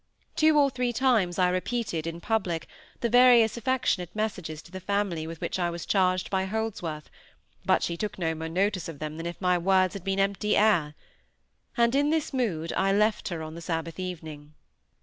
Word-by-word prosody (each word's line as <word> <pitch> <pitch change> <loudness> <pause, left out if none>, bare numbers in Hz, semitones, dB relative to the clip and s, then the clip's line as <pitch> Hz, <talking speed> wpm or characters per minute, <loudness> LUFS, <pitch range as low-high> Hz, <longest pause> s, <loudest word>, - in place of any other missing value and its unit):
Two 310 -1 +4
or 280 -2 +4
three 250 -1 -1
times 225 -8 +2
I 180 -1 +3
repeated, 185 -3 -2
in 165 +1 -5
public, 185 -7 -1 0.4
the 235 - +2
various 245 -2 +6
affectionate 235 -7 0
messages 185 -8 -3
to 170 - -17
the 190 - -6
family 185 -4 -1
with 165 0 -7
which - - -3
I 175 -1 +1
was 170 -1 -6
charged 185 -2 +1
by 190 -1 +1
Holdsworth; 190 -7 -4 0.6
but - - +3
she 170 - -1
took 210 +1 -4
no 165 -3 -1
more 160 0 -5
notice 185 0 0
of 160 - -8
them 155 +1 -5
than 165 +1 -4
if 170 - -6
my 180 -2 +2
words 185 +1 +3
had 200 - -7
been 195 0 -1
empty 200 +2 +1
air. 175 -9 +3 0.8
And 235 0 +3
in 285 +2 +3
this 315 -1 0
mood 175 -11 -1
I 195 0 +1
left 210 +2 +1
her 170 -5 -4
on 155 0 -7
the 170 - -8
Sabbath 165 +1 -4
evening. 155 -5 -7
185 Hz, 195 wpm, -27 LUFS, 165-220 Hz, 0.8 s, various